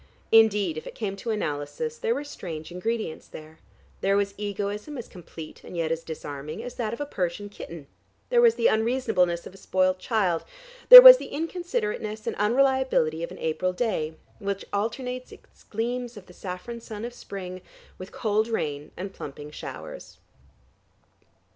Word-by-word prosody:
Indeed, 210 -7 +4
if - - -13
it - - -9
came 200 -3 -3
to 230 - -6
analysis 210 - -3
there 465 0 0
were 290 - -3
strange 165 - -7
ingredients 215 -1 -3
there; 155 +1 -12 0.4
there 195 +1 +2
was 200 -1 0
egoism 205 +6 -4
as 240 - -7
complete, 165 -3 -11
and 175 - -9
yet 165 -1 -1
as 165 0 -2
disarming, 150 +4 -7
as 245 0 -7
that 220 -3 -3
of 235 - -6
a 290 - -2
Persian 195 -5 -3
kitten; 170 -6 -9 0.5
there 485 -1 +5
was 465 -1 +6
the - - -2
unreasonableness 220 - +2
of - - -10
a - - -14
spoilt 185 -1 +1
child; 185 -5 0 0.5
there - - +15
was - - +13
the - - -7
inconsiderateness 345 - -3
and - - -2
unreliability 245 - +2
of 170 - -3
an - - -10
April 180 +3 -1
day, 165 -7 -2 0.2
which 200 -1 -3
alternates 250 +5 -3
its - - -17
gleams 240 +2 -3
of 195 - -11
the 180 - -16
saffron 190 +7 -7
sun 220 -1 -7
of 240 - -6
spring 185 -5 -8 0.4
with 185 +1 -9
cold 215 0 0
rain 150 -10 -3
and 190 +2 -6
plumping 145 +1 -9
showers. - - -9
205 Hz, 165 wpm, -26 LUFS, 175-240 Hz, 0.5 s, there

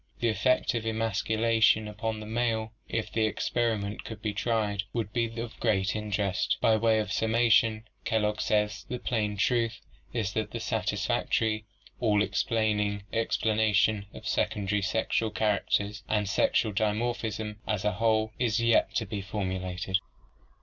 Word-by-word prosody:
The 120 - +2
effect 125 +3 +2
of 115 -2 -2
emasculation 110 0 +2
upon 110 +1 -3
the - - -7
male 110 -1 -1 0.2
if 115 -1 -2
the 110 -1 +1
experi 115 -3 0
ment 100 +1 -5
could 110 -2 -7
be 105 -1 -2
tried 105 -2 0
would 110 -3 -3
be 115 -1 -1
of 115 -1 -6
great 95 -4 +1
interest. 105 -3 0
By 110 - +4
way 110 0 +3
of 105 -1 -1
summation 110 0 +3 0.2
Kellogg 105 -2 0
says: 105 -1 0
"The 125 - -2
plain 105 -4 -1
truth 115 +2 +1 0.3
is 105 -4 -2
that 110 -1 -1
the 115 - -5
satisfactory, 110 0 0 0.3
all 105 -3 +3
explaining 105 -3 0
explanation 110 -2 +2
of - - -9
secondary 100 0 0
sexual 110 +2 0
char 105 -1 +1
acters 105 +1 -1
and 105 -2 +1
sexual 105 +2 +2
dimorphism 110 0 -1
as 105 -2 -1
a 105 - +3
whole 110 +2 +1
is 120 -2 +1
yet 115 0 +3
to - - +1
be 100 -2 -4
formulated." 95 -1 -2
110 Hz, 150 wpm, -28 LUFS, 105-115 Hz, 0.3 s, By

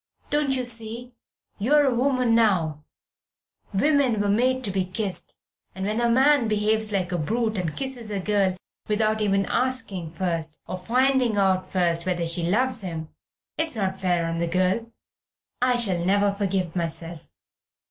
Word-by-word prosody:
Don't 295 -1 +1
you 255 - -1
see 235 +1 -3 0.5
you're 290 +8 +4
a 265 - +2
woman 250 -1 +1
now 175 -10 +2 0.9
women 265 +1 +2
were 205 0 0
made 255 +5 +1
to 205 - -1
be 190 0 0
kissed, 185 +1 -3 0.4
and 190 0 -4
when 215 +3 -1
a 235 - +2
man 265 +1 +4
behaves 215 0 +1
like 185 -3 -1
a 175 - -1
brute 220 +5 -1
and 165 -4 -3
kisses 260 -5 -3
a 205 -2 -2
girl 195 -1 +1 0.3
without 215 0 +1
even 195 -1 +1
asking 245 -10 -1
first, 165 -2 -1
or - - -5
finding 250 +2 +2
out 190 -2 +2
first 170 -2 +1
whether 175 -2 0
she 165 +1 +3
loves 230 +8 +1
him, 165 -4 -5 0.5
it's 320 -4 0
not 190 -3 -2
fair 175 -2 +1
on 165 0 -2
the 170 - 0
girl. 185 +6 0 0.7
I 250 0 +3
shall 195 -8 +1
never 200 +2 +2
forgive 195 -4 -2
myself. 165 -1 -5
205 Hz, 160 wpm, -24 LUFS, 180-240 Hz, 0.9 s, you're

